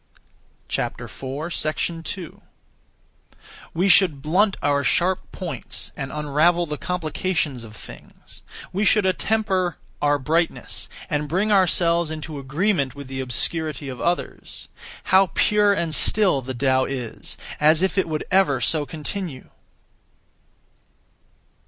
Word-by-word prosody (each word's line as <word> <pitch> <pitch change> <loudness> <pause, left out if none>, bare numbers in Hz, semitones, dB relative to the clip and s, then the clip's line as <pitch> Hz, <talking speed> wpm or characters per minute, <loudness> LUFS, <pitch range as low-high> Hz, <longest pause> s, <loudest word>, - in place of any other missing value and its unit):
2. 160 +4 -4 1.3
We 180 +4 +1
should 170 -6 +5
blunt 190 +6 +2
our 145 0 +2
sharp 180 +7 +1
points, 165 -9 -6
and 135 -1 -5
unravel 150 +4 +2
the 150 -3 -5
complications 160 -6 -2
of 110 -2 -11
things; - - -13 0.3
we 200 +3 0
should 210 -1 +4
attemper 190 -2 +1 0.3
our 145 0 +3
brightness, 160 +5 -1 0.2
and 150 0 -2
bring 195 +7 +1
ourselves 170 -3 +3
into 155 -1 -6
agreement 145 0 0
with 140 -2 -9
the 130 0 -3
obscurity 145 +3 -2
of 125 -2 -7
others. 175 +1 -3 0.3
How 190 +1 +5
pure 210 -1 +4
and 170 -5 0
still 190 -5 +4
the 130 0 -6
Tao 130 +1 +2
is, 125 -4 -5 0.2
as 155 +3 +4
if 190 - +1
it 190 -4 +1
would 155 -1 -2
ever 185 -9 +3
so 145 +4 0
continue! 160 -2 -6
160 Hz, 115 wpm, -23 LUFS, 140-185 Hz, 1.3 s, should